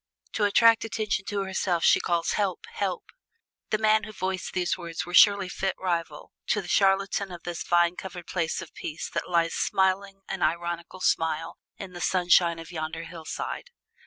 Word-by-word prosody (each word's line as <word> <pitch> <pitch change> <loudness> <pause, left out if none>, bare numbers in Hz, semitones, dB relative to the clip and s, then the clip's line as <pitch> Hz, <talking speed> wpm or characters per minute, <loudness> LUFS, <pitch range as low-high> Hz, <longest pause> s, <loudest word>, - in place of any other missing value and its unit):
To 210 - +1
attract 230 +2 +5
attention 215 -3 -2
to 200 -1 -2
herself 190 -2 -1
she - - +6
calls, 170 -1 0
'Help, 200 -4 -1
help!'" 485 - -3 0.6
The 215 - +2
man 215 0 +3
who 215 - -8
voiced 190 -2 -3
these 180 -1 0
words 170 -2 -5
was 175 +1 -4
surely 200 -2 +6
fit 190 +1 -2
rival 170 -5 -3
to 210 - +2
the 190 - -7
chatelaine 195 +1 +2
of 175 -1 -9
this 175 -2 -5
vine 175 0 +3
covered 180 -2 -8
place 170 -3 -2
of 165 - -14
peace 155 0 -5
that - - -3
lies 170 -1 +2
smiling 195 0 0
an 190 - -4
ironical 170 +2 -2
smile 160 -1 0 0.2
in 190 -2 -8
the 175 - -8
sunshine 175 -2 +3
on 165 - -8
yonder 160 0 -4
hillside. 170 - -6
180 Hz, 175 wpm, -27 LUFS, 170-195 Hz, 0.6 s, she